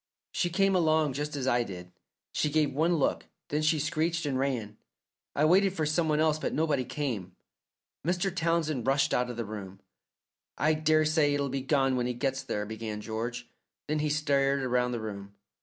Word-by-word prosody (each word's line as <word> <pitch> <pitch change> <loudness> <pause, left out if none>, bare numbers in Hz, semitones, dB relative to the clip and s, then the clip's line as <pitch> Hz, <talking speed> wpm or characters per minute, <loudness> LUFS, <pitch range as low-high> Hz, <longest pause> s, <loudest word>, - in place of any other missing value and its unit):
She 175 - 0
came 195 +2 +2
along 155 -4 +3
just 150 +2 -3
as 135 -3 -2
I 120 -2 +3
did. 90 -5 -7 0.4
She 150 - 0
gave 150 -2 +1
one 165 +5 +2
look, 145 - 0 0.2
then 150 +1 0
she 155 +1 +3
screeched 160 +2 0
and 135 -3 -1
ran. 120 -6 -2 0.6
I 150 - +3
waited 190 +4 +4
for 160 -5 -1
some 160 +2 +1
one 150 0 +2
else, 155 -1 +2
but - - -2
nobody 150 -4 +1
came." 115 -13 -4 0.7
Mr. 180 +3 0
Townsend 160 -7 0
rushed 140 +1 +2
out 125 0 +1
of 120 - -6
the 115 - -2
room. 100 -2 -7 0.8
"I 155 +1 +3
daresay 155 -1 +3
it'll 140 -1 -1
be 135 +1 -2
gone 135 -1 +2
when 120 0 0
he 125 - -2
gets 135 +2 -1
there," 105 -6 -3
began 110 0 -5
George, 115 +3 -4 0.4
then 155 +1 0
he 150 0 0
stared 140 -2 +1
round 125 0 +1
the 120 - -2
room. 100 -2 -7
140 Hz, 190 wpm, -29 LUFS, 120-155 Hz, 0.8 s, waited